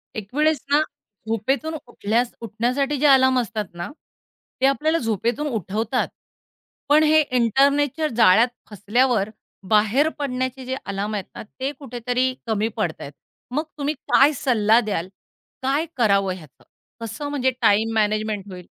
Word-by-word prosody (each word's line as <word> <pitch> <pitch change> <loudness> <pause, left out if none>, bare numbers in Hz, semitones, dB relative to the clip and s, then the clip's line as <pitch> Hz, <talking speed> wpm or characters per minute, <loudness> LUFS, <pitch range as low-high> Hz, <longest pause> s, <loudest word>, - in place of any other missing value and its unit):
एक 210 +2 -7
वेळेस 305 -2 +3
ना 295 - +5 0.5
झोपेतून 265 +8 -1
उठल्यास 235 +1 -1
उठण्यासाठी 250 +6 -1
जे 300 - +1
अलार्म 260 -1 +5
असतात 215 -2 -3
ना, 175 0 -5 0.7
ते - - +4
आपल्याला 305 +4 +2
झोपेतून 235 - -1
उठवतात. 225 - -1 0.8
पण 300 +2 +6
हे 310 0 +5
इंटरनेटच्या 280 +5 +2
जाळ्यात 225 +3 +6 0.2
फसल्यावर 215 +1 +1 0.4
बाहेर 220 +8 +3
पडण्याचे 260 -1 -3
जे 260 +1 -2
अलार्म 200 +2 -3
आहेत 200 - -3
ना, - - -7
ते 260 +6 -5
कुठेतरी 250 0 -1
कमी 220 0 0
पडतायेत. 160 -8 -3 0.4
मग 295 +5 0
तुम्ही 290 +1 -1 0.2
काय 285 +3 +6
सल्ला 225 -3 +3
द्याल? 195 -5 -3 0.6
काय 280 +5 +1
करावं 200 -5 +2
ह्याचं? 155 -7 -15 0.4
कसं 230 +6 -5
म्हणजे 260 -3 +1
टाईम 220 +1 +3
मॅनेजमेंट 215 -1 0
होईल? 180 -1 -9
240 Hz, 135 wpm, -22 LUFS, 215-275 Hz, 0.8 s, पण